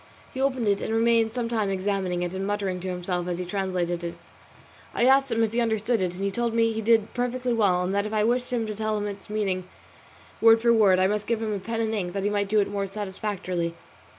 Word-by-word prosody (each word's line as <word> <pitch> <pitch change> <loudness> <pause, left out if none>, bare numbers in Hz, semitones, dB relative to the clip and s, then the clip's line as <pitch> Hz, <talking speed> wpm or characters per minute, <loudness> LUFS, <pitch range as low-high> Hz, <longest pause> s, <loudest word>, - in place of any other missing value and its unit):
He 265 - -3
opened 260 -4 0
it 200 -1 +2
and - - -3
remained 225 0 +2
some 240 -2 -1
time 220 -4 0
examining 190 -2 -1
it 175 0 -3
and 190 +1 -3
muttering 200 -3 -2
to 185 - -6
himself 180 -1 -3
as 175 -1 -2
he 180 - -4
translated 180 -2 -2
it. 170 0 -4 0.8
I 240 - +3
asked 270 0 +4
him 230 0 +2
if 220 - 0
he 240 +2 +1
understood 225 0 0
it, 180 -1 -1
and 190 - -5
he 200 - 0
told 235 +2 -1
me 230 -1 +3
he 220 - -3
did 225 -1 +2
perfectly 250 0 -1
well, 190 -6 +2
and 185 +2 -2
that 200 +1 0
if - - -7
I 215 -1 +2
wished 245 +3 0
him 235 -2 0
to 215 - -4
tell 215 0 -1
me 205 0 -2
its 200 +1 -12
meaning 195 -4 -1 0.7
word 225 0 +7
for 235 +1 +4
word, 205 -5 +5
I 185 - +3
must 210 +1 -1
give 230 -1 0
him 210 -2 -2
pen 230 +4 -3
and 220 -1 -1
ink 180 -5 -2
that 195 -1 -2
he 205 - +1
might 200 -1 0
do 215 +1 +3
it 200 - 0
more 200 -1 -2
satisfactorily. 190 -4 -3
210 Hz, 255 wpm, -26 LUFS, 190-230 Hz, 0.8 s, word